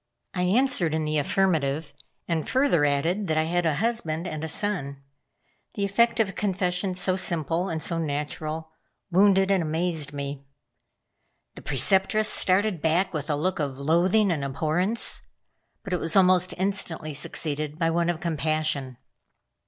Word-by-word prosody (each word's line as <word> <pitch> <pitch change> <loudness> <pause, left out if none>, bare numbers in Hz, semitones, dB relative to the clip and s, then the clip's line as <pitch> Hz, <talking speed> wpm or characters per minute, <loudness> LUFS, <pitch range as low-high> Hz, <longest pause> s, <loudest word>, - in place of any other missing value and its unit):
I 180 - -2
answered 180 - +2
in 160 -1 -1
the 155 0 0
affirmative, 155 -3 0 0.3
and 165 -3 -2
further 260 - +3
added 165 +8 0
that 155 -1 0
I 155 - +3
had 175 +1 0
a 155 - +1
husband 180 -5 -1
and 155 -3 -5
a - - -2
son. 145 -7 -2 0.7
The 200 - 0
effect 230 +4 +2
of 220 - +3
a - - -8
confession 185 -1 -1
so 185 0 +1
simple, 170 0 -1
and 160 -2 -3
so 170 0 -1
natural, 155 +1 -4 0.4
wounded 195 +1 +4
and 195 -2 +3
amazed 160 -2 -1
me. 140 -1 -5 1.1
The - - -11
Preceptress 195 - +2
started 190 -2 +1
back 165 +5 +1
with 150 -1 -3
a 150 - +2
look 185 +6 -1
of 140 -3 -2
loathing 175 +8 +2
and 150 -4 -1
abhorrence; 160 - -1 0.6
but 195 -4 -5
it 180 - +1
was 165 0 -1
almost 185 -1 +4
instantly 175 -5 -2
succeeded 150 +1 -3
by 165 -1 +1
one 170 +1 +1
of 170 -2 -1
compassion. 155 -5 -1
165 Hz, 155 wpm, -25 LUFS, 155-190 Hz, 1.1 s, wounded